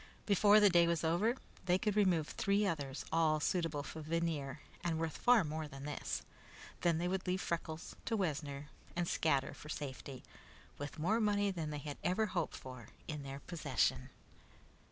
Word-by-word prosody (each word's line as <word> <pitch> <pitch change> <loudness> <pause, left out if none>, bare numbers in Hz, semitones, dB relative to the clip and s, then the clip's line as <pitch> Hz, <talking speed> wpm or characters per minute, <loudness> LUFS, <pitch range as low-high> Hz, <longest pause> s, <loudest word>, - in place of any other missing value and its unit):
Before 205 +1 +6
the 205 -2 +6
day 170 -1 +6
was 170 -1 +1
over, 175 +9 +2 0.3
they 180 -1 +4
could 205 +2 0
remove 180 -7 +3
three 200 +1 +2
others, 145 -7 -2
all 160 -1 +3
suitable 160 -2 0
for 160 - -7
veneer 155 -3 -1 0.2
and 170 -2 0
worth 160 -1 -2
far 245 -4 +5
more 155 0 -3
than 135 -1 -9
this. 150 - -3 0.6
Then 170 -2 +3
they 175 +2 0
would 185 +1 -2
leave 185 +1 +1
Freckles 165 -2 -3
to 225 - 0
Wessner 145 -5 -2 0.3
and 175 0 0
scatter 140 -6 +1
for 150 - -11
safety, 135 -3 -6 0.6
with 145 +2 -5
more 190 +9 +2
money 205 -2 +2
than 165 -4 -3
they 150 - -3
had 145 0 -6
ever 200 +5 +2
hoped 180 -5 -2
for 125 -4 -9 0.2
in 150 -2 -4
their 135 0 -7
possession. 140 - 0
165 Hz, 175 wpm, -36 LUFS, 150-185 Hz, 0.6 s, Before